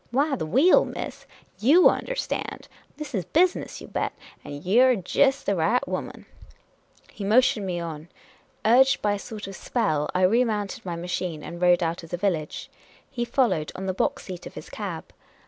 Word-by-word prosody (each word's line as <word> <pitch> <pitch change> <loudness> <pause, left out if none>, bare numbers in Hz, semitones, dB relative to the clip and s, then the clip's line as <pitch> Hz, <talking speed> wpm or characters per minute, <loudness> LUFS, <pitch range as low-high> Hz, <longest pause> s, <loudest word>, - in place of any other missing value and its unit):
" - - -34
Why, 280 +4 +1
the 160 - -4
wheel, 275 - +5
miss! - - -7 0.3
Vott 305 +11 +5
understand! - - -4 0.3
This 300 -3 -7
is 195 -5 -1
busi 350 - +3
ness, - - -8
you - - -9
bet! - - -2 0.3
And 145 +2 -8
you 210 +7 +4
're 260 -1 +5
jest 270 +8 +1
the 200 - +1
right 210 +9 +1
woman! - - -5 0.4
" - - -30
He 205 - -7
motioned 215 -1 +3
me 175 -1 -2
on. 165 -1 -7 0.6
Urged 260 +4 +5
by 205 -1 +2
a 205 - -3
sort 215 -1 -8
of 195 0 -8
spell, 155 -13 -1
I 185 - +2
re 225 +7 +4
mounted 210 -4 -3
my 175 - -3
machine 170 -2 -4
and 170 +1 -8
rode 175 0 +4
out 165 +1 -2
of 165 - -12
the 175 - -3
village. 175 -5 -2 0.4
He 245 -3 -2
followed, 235 - +1
on 190 - -5
the 190 - -1
box - - -1
seat 180 -2 -8
of - - -13
his - - -9
cab. - - -6
200 Hz, 200 wpm, -25 LUFS, 175-250 Hz, 0.6 s, wheel